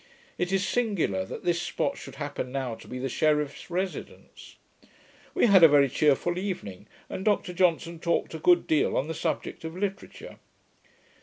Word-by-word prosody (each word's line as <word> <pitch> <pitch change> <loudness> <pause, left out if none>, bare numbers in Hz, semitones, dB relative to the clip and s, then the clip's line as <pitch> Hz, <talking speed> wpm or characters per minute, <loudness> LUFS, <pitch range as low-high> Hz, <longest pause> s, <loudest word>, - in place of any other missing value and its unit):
It 180 +1 -1
is 195 +1 +1
singular 195 - 0
that - - -8
this 175 -1 +1
spot 275 +9 -2
should - - -10
happen 145 -3 -5
now 130 -3 -2
to - - -12
be 125 - -6
the 130 +1 -2
sheriff's 150 +3 0
residence. 185 +2 -6 0.8
We 365 - +4
had 200 -5 +6
a 165 - +11
very 140 -2 +4
cheerful 155 +6 +2
evening, 105 - -5 0.2
and 190 - -5
Dr 205 -3 +1
Johnson 170 -2 +1
talked 170 0 -1
a 160 - -5
good 175 +2 +4
deal 155 - +2
on 135 - 0
the 160 - -3
subject 160 - -3
of 160 +2 -6
literature. 195 0 -5
165 Hz, 170 wpm, -27 LUFS, 145-185 Hz, 0.8 s, a